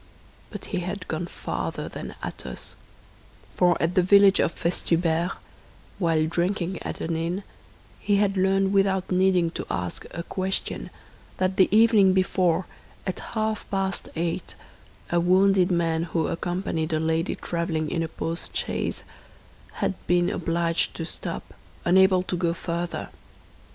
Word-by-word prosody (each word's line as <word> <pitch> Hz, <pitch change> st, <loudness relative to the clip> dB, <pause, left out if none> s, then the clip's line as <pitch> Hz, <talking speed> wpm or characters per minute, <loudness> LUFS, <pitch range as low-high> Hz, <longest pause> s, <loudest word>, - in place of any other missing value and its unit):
But -, -, -8 dB
he 185 Hz, -, +1 dB
had 180 Hz, +2 st, -5 dB
gone 165 Hz, +2 st, -3 dB
farther -, -, -4 dB
than -, -, -7 dB
Athos—for 175 Hz, -2 st, -4 dB
at 165 Hz, +1 st, +1 dB
the 185 Hz, -, +4 dB
village 200 Hz, +1 st, +6 dB
of -, -, +3 dB
Festubert, 170 Hz, 0 st, 0 dB, 0.7 s
while 165 Hz, -4 st, +2 dB
drinking 175 Hz, +2 st, -1 dB
at -, -, -5 dB
an 165 Hz, 0 st, -1 dB
inn, 170 Hz, +4 st, -2 dB, 0.6 s
he 205 Hz, -, +1 dB
had 200 Hz, -1 st, +2 dB
learned 195 Hz, +1 st, +2 dB
without 195 Hz, -1 st, +2 dB
needing 185 Hz, -2 st, +3 dB
to -, -, -5 dB
ask 90 Hz, 0 st, -4 dB
a 170 Hz, -, -5 dB
question 190 Hz, +2 st, -2 dB, 0.5 s
that 185 Hz, +1 st, 0 dB
the 190 Hz, -, +5 dB
evening 215 Hz, -2 st, +6 dB
before, 185 Hz, -2 st, +2 dB, 0.4 s
at 185 Hz, -, -3 dB, 0.2 s
half 220 Hz, 0 st, -1 dB
past 195 Hz, -1 st, -2 dB
eight, 165 Hz, 0 st, -3 dB, 0.6 s
a 175 Hz, -, +3 dB
wounded 185 Hz, +1 st, +4 dB
man 165 Hz, -2 st, +1 dB
who 165 Hz, -2 st, -1 dB
accompanied 170 Hz, -2 st, -2 dB
a 155 Hz, -, +2 dB
lady 160 Hz, +2 st, 0 dB
traveling 165 Hz, -3 st, -2 dB
in 165 Hz, -, 0 dB
a 165 Hz, -, -1 dB
post 165 Hz, +1 st, -4 dB
chaise -, -, -2 dB, 0.8 s
had -, -, +1 dB
been 175 Hz, 0 st, +3 dB
obliged 165 Hz, 0 st, 0 dB
to 165 Hz, -, -4 dB
stop, -, -, -6 dB, 0.3 s
unable 185 Hz, +1 st, +5 dB
to 185 Hz, -, -3 dB
go 170 Hz, -1 st, 0 dB
further. 170 Hz, 0 st, -3 dB
180 Hz, 140 wpm, -25 LUFS, 165-190 Hz, 0.8 s, village